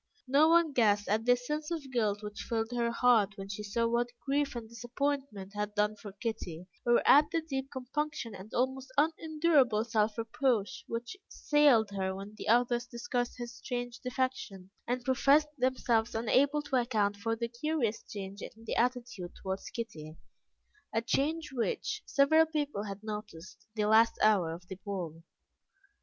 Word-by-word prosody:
No 285 +5 +5
one 335 -2 +4
guessed 210 -4 +3
at 220 +2 +1
the 245 0 +6
sense 300 +5 -4
of 310 -6 -4
guilt 215 -4 0
which 210 0 -7
filled 225 0 -2
her 240 -1 0
heart 235 -4 +3
when 195 0 -7
she 200 +1 -5
saw 210 +3 -1
what 235 +1 +1 0.2
grief 280 0 0
and 235 -2 -5
disappointment 240 -3 -3
had 210 0 -3
done 210 +1 +1
for 205 -1 -10
Kitty, 190 -5 -5 0.2
or 240 - +4
at 295 +2 +7
the 330 - 0
deep 270 -4 -4
compunction 260 -2 -4
and 195 +3 -10
almost 260 +1 -1
unendurable 305 -6 +3
self 220 -2 +1
reproach 230 -2 0
which 235 +8 -4
assailed 280 -8 +3
her 190 -1 -2
when 200 +2 -8
the - - -8
others 240 +1 +3
discussed 245 0 -3
his 240 0 -6
strange 245 -1 -4
defection, 250 -7 -3 0.2
and 245 0 -2
professed 280 +3 +4
themselves 240 -3 +1
unable 275 +6 +2
to 280 -3 0
account 215 -5 +1
for 225 +2 -1
the 235 +1 -2
curious 235 -2 -1
change 200 -1 -8
in - - -5
his 225 0 -14
attitude 245 -6 -1
towards 190 0 -4
Kitty 160 -9 -7 0.7
a 225 +1 0
change 300 +5 0
which 240 -3 -2
several 315 +3 +4
people 295 -9 -2
had 200 0 -7
noticed 210 -5 -8
the 210 -1 +1
last 225 +2 +5
hour 200 -6 +4
of 175 +2 -9
the 190 - -7
ball. 175 -6 -5
235 Hz, 165 wpm, -31 LUFS, 210-265 Hz, 0.7 s, at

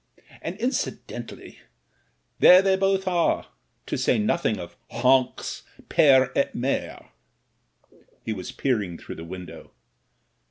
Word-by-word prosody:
And, 185 - -5
incidentally, 220 - -5 0.8
there 185 +1 +8
they 195 -1 +3
both 195 0 0
are, 175 -2 +1 0.4
to - - -3
say - - +2
nothing 190 - 0
of 85 -1 -9
Honks 125 +2 +1 0.3
pere 130 -3 +5
et 140 - 0
mere,'' 130 +3 -3 1.2
He 110 - -2
was 95 -4 -7
peering 105 -10 -1
through - - -9
the 80 - -8
window. 90 0 -10
130 Hz, 115 wpm, -25 LUFS, -, 1.2 s, there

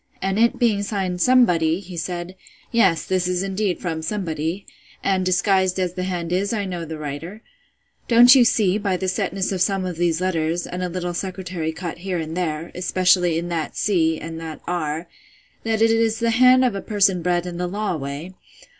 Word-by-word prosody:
And 195 +2 -1
it 235 +1 +3
being 220 -4 +2
signed 190 -3 -2
Somebody, 175 -10 +4
he 185 -2 -10
said, 175 +2 -4 0.4
Yes, 205 -8 +3
this 185 -1 0
is 180 0 -1
indeed 195 -1 -1
from 165 -4 -3
Somebody; 165 0 -3 0.4
and, 190 -1 +1
disguised 185 0 +2
as 180 -2 -1
the 185 0 -3
hand 175 -2 -3
is, 200 +4 0
I 205 -3 -1
know 175 -3 -4
the 160 0 -6
writer: 155 +9 -7 0.6
Don't 240 +1 +8
you 260 -3 +7
see, 210 -4 +2
by 195 -3 0
the 190 - -3
setness 190 0 -1
of 185 -2 -2
some 195 0 +1
of 180 -3 -4
these 170 -1 +1
letters, 170 -2 -1
and 180 - -5
a 180 - -2
little 175 0 -3
secretary 180 -3 -4
cut 170 +1 -6
here 185 0 -3
and 160 0 -4
there, 165 -2 -3
especially 180 -1 +2
in 170 +1 -3
that 165 -2 -3
c, 160 -6 +1
and 165 0 -7
that 160 -2 -7
r, 165 -1 -3 0.5
that 225 0 0
it 225 - +4
is 225 -1 +2
the 230 0 +1
hand 255 +2 +5
of 245 - +1
a 195 - -4
person 195 -4 +2
bred 175 0 0
in 175 -1 -6
the 180 0 -2
law 205 0 -2
way? 145 +5 -6
180 Hz, 200 wpm, -22 LUFS, 170-200 Hz, 0.6 s, Don't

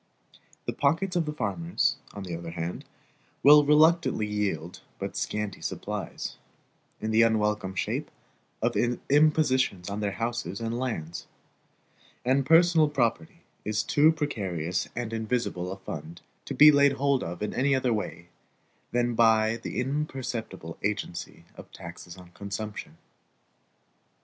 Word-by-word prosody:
The - - -2
pockets 165 +7 +1
of 170 -3 +1
the - - -1
farmers, 165 +3 0
on 100 - -7
the 90 -3 -5
other 85 0 -6
hand, 85 +1 -5 0.6
will 150 +1 +9
reluctantly 155 -4 +4
yield 100 -6 -3 0.2
but - - -5
scanty 105 -3 -3
supplies, - - -5 0.6
in 110 - -2
the 110 +1 +5
unwelcome 105 -4 +1
shape - - -2 0.5
of 120 0 +1
impositions 130 - +2
on 100 - -3
their 100 -2 -1
houses 115 -4 -3
and 115 0 -3
lands; 85 -11 -4 1.0
and 135 +1 +2
personal 165 -1 +5
property 115 - -1 0.2
is 110 +1 0
too 150 +2 +4
precarious 95 - -2
and 115 -1 -3
invisible 110 -5 -2
a 95 - -5
fund 80 -3 -8 0.2
to - - -5
be 150 +1 +9
laid 140 -1 +5
hold 140 -1 +1
of 85 +4 -5
in 105 - -2
any 135 +2 +2
other 130 -2 +1
way 85 -5 -4 0.6
than 120 0 +1
by 110 -1 +4
the - - -5
imperceptible 125 - -4
agency 100 -4 -4
of - - -12
taxes 85 +1 -10
on 90 -1 -14
consumption. 100 +3 -6
115 Hz, 135 wpm, -27 LUFS, 95-140 Hz, 1.0 s, will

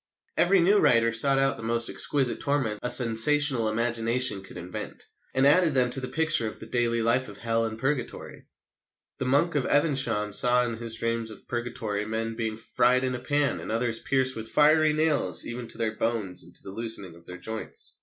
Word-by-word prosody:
Every 185 +1 +3
new 200 +4 +4
writer 115 -6 +3
sought 135 +4 +4
out 135 0 +1
the - - -9
most 115 +1 +2
exquisite 135 -4 +1
torments 135 -7 -1
a 125 - -2
sensational 120 +1 +4
imagination 115 -1 0
could 95 - -13
invent, 90 +1 -8 0.3
and 130 +1 +1
added 160 +1 +3
them 125 -1 +2
to 130 - +3
the 130 - -5
picture 155 -3 0
of 110 - -8
the - - -8
daily 115 -1 -1
life 125 +3 +1
of 100 - -11
Hell 115 0 -1
and 110 0 -5
Purgatory. 130 0 -4 0.7
The - - -2
Monk 145 +7 +2
of 145 -4 -1
Evesham 130 -9 +1
saw 125 +3 +3
in 115 -2 -4
his 115 -1 -3
dream 115 0 -2
of 110 - -12
Purgatory 115 -4 -4
men 115 +1 -3
being 110 -1 -4
fried 125 +3 +1
in 130 0 -1
a 125 - -4
pan 145 +3 -1
and - - -7
others 115 0 -1
"pierced 130 -1 -1
with 110 0 -6
fiery 155 +1 +4
nails 155 -1 0
even 120 0 -6
to - - -6
their 110 -2 -2
bones 110 -5 -2
and 85 - -17
to - - -6
the 95 - -9
loosening 110 -4 -4
of 85 0 -17
their 90 - -9
joints." 110 +5 -6
120 Hz, 205 wpm, -26 LUFS, 110-135 Hz, 0.7 s, new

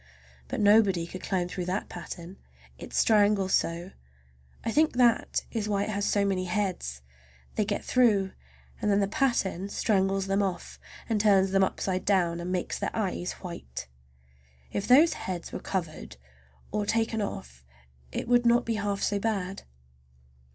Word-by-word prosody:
But - - -4
nobody 205 -4 +4
could 185 +2 -8
climb 180 -3 -1
through 180 0 -4
that 185 +3 -2
pattern—it 65 - -11
strangles 205 -3 +3
so; 170 +3 0 0.7
I 225 - 0
think 310 +5 +3
that 240 -2 +2
is 215 -3 -2
why 200 -1 +1
it - - -4
has 200 -1 -1
so 200 -1 +2
many 190 -2 0
heads. 180 - -2 0.5
They 215 - 0
get - - -3
through, 210 -7 +3 0.5
and 210 - +1
then 200 0 +3
the 200 - +2
pattern 205 - 0
strangles 195 -2 +1
them 195 +1 +1
off 185 -3 -3 0.3
and 220 -3 +1
turns 195 -3 +4
them 195 0 +4
upside 185 -1 -1
down, 175 -4 +2
and 175 +1 -4
makes 180 -1 -2
their - - -1
eyes 185 -4 -2
white! 65 - -7 0.8
If 200 - -3
those 295 +7 +6
heads 180 -2 -5
were - - -4
covered 155 - -4 0.5
or 210 0 -1
taken 225 0 0
off 65 - -6 0.5
it - - -4
would 245 0 +4
not 240 +1 +4
be 230 - 0
half 200 -1 -2
so 205 0 +1
bad. 195 -3 -2
195 Hz, 160 wpm, -28 LUFS, 180-210 Hz, 0.8 s, those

